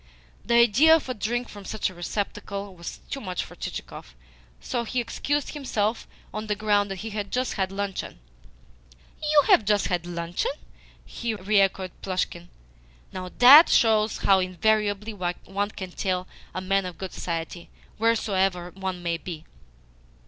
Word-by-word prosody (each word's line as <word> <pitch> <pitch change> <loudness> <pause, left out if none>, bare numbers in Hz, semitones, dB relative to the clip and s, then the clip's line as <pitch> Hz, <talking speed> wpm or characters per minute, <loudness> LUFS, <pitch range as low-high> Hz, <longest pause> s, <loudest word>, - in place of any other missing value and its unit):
The 235 - +1
idea 240 +8 +6
of 320 - -2
a - - 0
drink 240 +3 -2
from 205 -1 -11
such 215 +2 -2
a 185 - -6
receptacle 200 +2 -4
was 170 -1 -8
too 275 - -3
much 185 -5 -3
for - - -13
Chichikov, - - -7 0.4
so 155 - -2
he 250 +2 -2
excused 280 +5 -1
himself 230 -6 -2 0.3
on 215 +1 -4
the 210 - 0
ground 205 -1 +2
that 195 - -3
he 225 - -5
had 205 -1 -4
just 255 +1 0
had 190 -2 -1
luncheon. 200 -1 -4 1.0
"You 300 -1 +4
have - - +7
just 205 0 +1
had 175 -2 -1
luncheon?" 170 0 -2 0.7
re 210 -3 +2
echoed 190 -1 0
Plushkin. 180 -2 -3 0.6
"Now, 185 -1 -5
THAT 280 +7 +10
shows 220 -2 +3
how 195 -1 +4
invariably 210 +3 0
one 195 +2 -3
can 190 -4 -7
tell 185 -1 -2 0.3
a 185 - -2
man 195 0 +1
of 175 -3 -8
good 190 -1 -6
society, 170 0 -5 0.3
wheresoever 195 -6 +1
one 190 -1 -5
may 170 -1 0
be. 165 -2 -8
200 Hz, 155 wpm, -25 LUFS, 185-220 Hz, 1.0 s, THAT